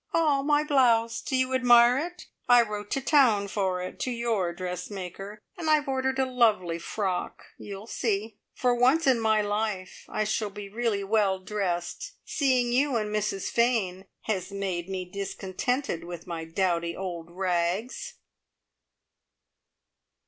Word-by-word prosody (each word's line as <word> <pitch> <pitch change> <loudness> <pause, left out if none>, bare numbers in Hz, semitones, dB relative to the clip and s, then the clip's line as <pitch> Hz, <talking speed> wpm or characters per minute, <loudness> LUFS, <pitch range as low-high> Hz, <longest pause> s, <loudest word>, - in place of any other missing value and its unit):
"Ah, 300 -4 +3
my 295 +1 +2
blouse! 240 -6 +3
Do 265 - -2
you 260 0 +1
admire 245 0 +6
it? 350 +2 -6 0.2
I 245 -1 +8
wrote 210 -2 -6
to 275 - -1
town 245 -8 +4
for 190 -3 -1
it, 185 - -7
to - - -1
your 230 -7 0
dressmaker, 185 +3 -6
and 330 -3 -3
I've 305 -2 +3
ordered 265 0 0
a 265 - +2
lovely 215 -10 +2
frock. 190 0 -3 0.2
You'll 200 0 -8
see. 220 -2 -2 0.2
For 250 -1 +2
once 255 +7 +3
in 260 -3 +4
my 220 -1 +3
life 205 -2 -3
I 215 - -1
shall 215 0 -1
be 200 0 -8
really 220 -2 -1
well 200 -2 +2
dressed! 190 - -3
Seeing 255 -4 +1
you 270 +2 +2
and 210 -2 -1
Mrs 205 -2 -1
Fane 215 -6 +1 0.2
has 190 -4 -3
made 190 -3 -3
me 185 -1 -3
discontented 195 - -3
with 175 -1 -8
my 165 -2 -5
dowdy 170 0 -1
old 175 -3 -5
rags!" 185 - -2
210 Hz, 145 wpm, -27 LUFS, 185-250 Hz, 0.2 s, I